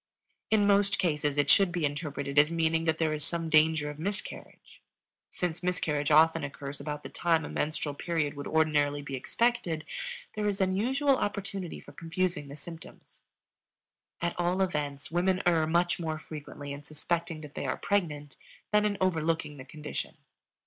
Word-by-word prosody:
In 215 -2 +4
most 200 0 +4
cases 150 -4 0
it 145 -1 +3
should 195 +2 +6
be 175 -3 0
interpreted 145 -1 -1
as 150 +2 +5
meaning 165 0 +1
that 160 -1 +2
there 160 -1 +1
is 150 -1 -3
some 165 +1 -2
danger 155 -1 +4
of 150 0 -6
miscarriage. 195 +4 -6 0.5
Since 175 -2 -3
miscarriage 155 -5 0
often 160 +1 +5
occurs 140 0 -6
about 150 -1 -5
the - - -7
time 165 -3 +1
a - - -6
menstrual 150 -1 -1
period 155 -1 -1
would 145 -1 -6
ordinarily 145 -2 +2
be 140 - -7
expected, 170 - 0 0.5
there 210 -1 0
is 200 0 -2
unusual 255 +9 +2
opportunity 200 -4 -3
for - - -13
confusing 165 -2 -2
the 140 - -8
symptoms. 165 +2 -12 1.0
At 170 - +1
all 175 +2 +1
events 145 -6 -3
women 180 +2 +2
err 165 -3 +4
much 175 +2 +2
more 160 -2 -2
frequently 145 -2 -8
in 140 - -7
suspecting 165 +2 -3
that 150 -2 -10
they - - -3
are 130 - -1
pregnant 150 -8 -1 0.3
than 210 0 +4
in 205 -1 +1
overlooking 165 -4 0
the 130 - -9
condition. 150 +1 -6
160 Hz, 165 wpm, -30 LUFS, 150-180 Hz, 1.0 s, should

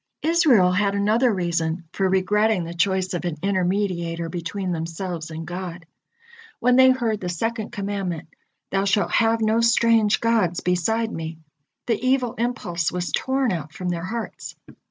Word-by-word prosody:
Israel 290 - +4
had 200 +2 +1
another 220 +5 +3
reason 170 -3 -1
for 190 -1 +1
regretting 205 +1 +2
the 170 +1 -6
choice 185 +1 0
of 175 - -3
an 175 -3 -2
intermediator 180 -3 -1
between 180 +2 -3
themselves 165 0 -4
and 160 0 -6
God. 175 -1 -6 0.7
When 250 +1 +3
they 260 0 +7
heard 235 -5 0
the 180 - -3
second 220 +5 -2
commandment: 195 -7 -4 0.4
"Thou 195 0 +1
shalt 200 +1 +1
have 225 0 +2
no 220 +1 +2
strange 230 -2 +4
gods 220 -7 +1
beside 220 +6 0
Me," 160 0 -5 0.5
the 230 0 -1
evil 255 -2 +1
impulse 175 -9 -1
was 180 0 -3
torn 265 -1 0
out 155 -4 -4
from 180 -1 -4
their 170 0 -3
hearts. 230 +4 -6
195 Hz, 155 wpm, -23 LUFS, 175-225 Hz, 0.7 s, they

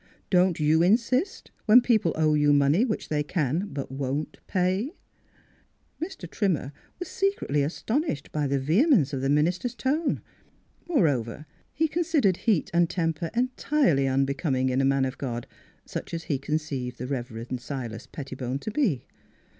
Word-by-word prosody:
Don't 180 -2 +3
you 155 +2 +3
insist, 235 - +1 0.2
when 220 +4 +9
people 220 -8 +2
owe 155 -1 +3
you 145 -1 +4
money 145 +8 +4
which 225 -5 -2
they 150 -1 +1
can 155 +4 -1
but 135 -2 -5
won't 135 +2 -3
pay? 190 - 0 0.5
" - - -37
Mr. 330 - -6
Trimmer 165 -7 -1 0.2
was 360 - -5
secretly 390 - 0
astonished 170 - -2
by 150 -2 0
the 140 +1 +1
vehemence 160 - +3
of 135 - -2
the 135 - 0
minister's 175 - +1
tone. 295 +6 0 0.7
Moreover, 150 - +1 0.3
he 320 +1 +1
considered 310 - +1
heat 195 -5 +1
and 170 -1 +3
temper 165 -2 -1
entirely 250 - +2
unbecoming 135 0 +1
in 130 +1 +1
a - - +2
man 135 0 +3
of 130 0 -5
God, 120 -3 -3 0.4
such - - -5
as 165 - -5
he 140 -5 -1
conceived 140 -4 -3
the 125 - -5
Rev. 120 -3 -5
Silas 120 -2 -6
Petti 135 -1 -7
bone 125 0 -3
to 215 - -5
be. 205 - 0
155 Hz, 155 wpm, -26 LUFS, 135-215 Hz, 0.7 s, when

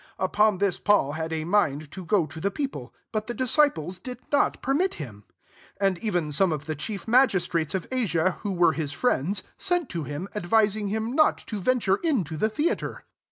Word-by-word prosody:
30 - - 0
Upon 210 +1 +3
this 195 -1 +1
Paul 205 -9 +3
had 160 +2 -4
a 160 -1 -2
mind 155 -5 +1
to 190 - -7
go 180 -1 +2
to 155 +1 -9
the 200 - +1
people, 200 - -5 0.2
but 215 -1 -2
the 240 - -4
disciples 250 - +1
did 250 +5 -7
not 285 - +2
permit 300 +9 0
him. 110 -9 -9 0.5
31 200 - +3
And 185 - -4
even 175 -8 -1
some 180 +4 +2
of 150 -2 -3
the 155 - -2
chief 190 +9 -5
magistrates 190 - +2
of 185 - -3
Asia, 185 -8 +1
who 205 - -2
were 175 -3 +3
his 150 -3 -3
friends, 185 - 0 0.2
sent 355 -5 +1
to 170 -3 -3
him, 150 +6 -5
advising 210 +1 +1
him 220 +4 -2
not 310 +2 +4
to 215 - -4
veo*! 255 +7 +2
ture 195 -4 +1
into 220 - 0
the 215 +8 +1
theatre. 295 +10 -2
195 Hz, 205 wpm, -26 LUFS, 160-225 Hz, 0.5 s, not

